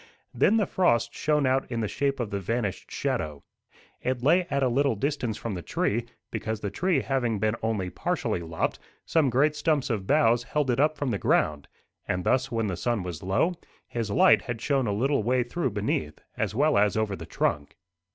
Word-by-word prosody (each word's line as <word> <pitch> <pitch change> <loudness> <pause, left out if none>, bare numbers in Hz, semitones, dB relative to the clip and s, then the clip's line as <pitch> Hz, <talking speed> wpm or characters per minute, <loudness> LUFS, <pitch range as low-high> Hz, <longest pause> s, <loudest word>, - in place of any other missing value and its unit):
Then 220 - +3
the 210 - +2
frost 120 -13 +1
shone 150 -2 +1
out 130 0 +1
in 115 -1 -1
the 110 - 0
shape 140 +4 -1
of 115 -4 -3
the 100 - -1
vanished 105 0 -3
shadow. 75 -2 -3 0.6
It 125 -1 -2
lay 175 +6 +4
at 140 0 +1
a - - +4
little 135 0 +2
distance 120 -2 -2
from 115 - -4
the 90 - -4
tree, 115 +6 -1 0.3
because 110 -1 -3
the 100 -2 -4
tree 175 - +1
having 125 -5 0
been 110 +2 0
only 105 -5 -1
partially - - -1
lopped, 80 -1 -2 0.3
some 155 -5 +2
great 145 +5 +2
stumps 150 -5 +1
of 100 -4 -2
boughs 120 -6 +4
held 135 +2 0
it 125 - 0
up 155 +1 +3
from 140 -4 -1
the 100 - -1
ground, 75 -2 +1 0.4
and 90 0 -1
thus, 130 +5 +1
when 115 -1 0
the 95 -4 -2
sun 120 -5 -1
was 90 -1 -6
low, 95 - +1 0.3
his 115 -3 -3
light 100 +1 +5
had 120 -2 -5
shone 135 0 +1
a - - 0
little 130 +6 +1
way 125 +3 +2
through 130 +4 -2
beneath, 100 -8 -2 0.2
as 105 -2 -2
well 145 -2 +3
as 105 +1 +2
over 110 -2 0
the - - -9
trunk. 70 -1 -1
120 Hz, 205 wpm, -27 LUFS, 100-140 Hz, 0.6 s, light